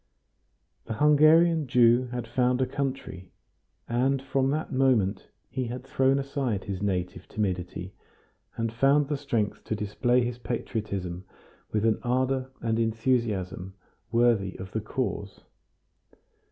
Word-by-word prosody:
The 115 Hz, -, -4 dB
Hungarian 155 Hz, +3 st, +5 dB
Jew 120 Hz, 0 st, +4 dB
had 120 Hz, -1 st, -4 dB
found 125 Hz, +2 st, +1 dB
a 130 Hz, -, +3 dB
country, 130 Hz, -11 st, -4 dB, 0.6 s
and 130 Hz, +3 st, +1 dB
from 135 Hz, 0 st, 0 dB
that 155 Hz, +3 st, -2 dB
moment 120 Hz, -7 st, +2 dB, 0.2 s
he 130 Hz, -, -3 dB
had 125 Hz, +2 st, -5 dB
thrown 135 Hz, 0 st, +2 dB
aside 135 Hz, -7 st, -2 dB
his 95 Hz, -1 st, -5 dB
native 90 Hz, -3 st, -2 dB
timidity, 90 Hz, -2 st, -3 dB, 0.6 s
and 115 Hz, -1 st, -1 dB
found 140 Hz, +4 st, +3 dB
the 150 Hz, -, +1 dB
strength 120 Hz, -7 st, -2 dB
to 110 Hz, -, -2 dB
display 120 Hz, +4 st, +1 dB
his 120 Hz, 0 st, -4 dB
patriotism 100 Hz, -7 st, -4 dB, 0.5 s
with 110 Hz, 0 st, 0 dB
an 110 Hz, -1 st, +2 dB
ardor 130 Hz, +1 st, 0 dB
and 115 Hz, -1 st, 0 dB
enthusiasm 110 Hz, -5 st, -1 dB, 0.4 s
worthy 115 Hz, -5 st, +2 dB
of 95 Hz, 0 st, -8 dB
the 110 Hz, -, -2 dB
cause. 105 Hz, -3 st, -4 dB
120 Hz, 125 wpm, -27 LUFS, 105-130 Hz, 0.6 s, Hungarian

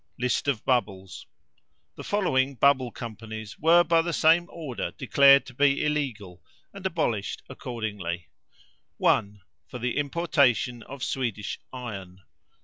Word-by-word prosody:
LIST 125 Hz, +3 st, -1 dB
OF 130 Hz, -6 st, -1 dB
BUBBLES. 100 Hz, -7 st, -2 dB, 0.7 s
The -, -, -10 dB
following 140 Hz, -10 st, +1 dB
Bubble 130 Hz, 0 st, +3 dB
Companies 110 Hz, -2 st, -8 dB
were 170 Hz, +3 st, +6 dB
by 165 Hz, 0 st, +3 dB
the 170 Hz, +1 st, -3 dB
same 165 Hz, +3 st, +4 dB
order 150 Hz, -8 st, -5 dB
declared 140 Hz, +1 st, +5 dB
to 130 Hz, -, -12 dB
be 140 Hz, +2 st, +2 dB
illegal, 120 Hz, -12 st, -3 dB, 0.3 s
and 200 Hz, -1 st, -10 dB
abolished 120 Hz, -, -2 dB
accordingly: 100 Hz, -8 st, -5 dB, 0.7 s
1. 100 Hz, 0 st, +1 dB, 0.3 s
For 125 Hz, -, -8 dB
the 125 Hz, 0 st, -2 dB
importation 140 Hz, -, +1 dB
of 135 Hz, +2 st, -9 dB
Swedish 120 Hz, -6 st, -3 dB
iron. 95 Hz, -7 st, -8 dB
125 Hz, 125 wpm, -26 LUFS, 110-145 Hz, 0.7 s, were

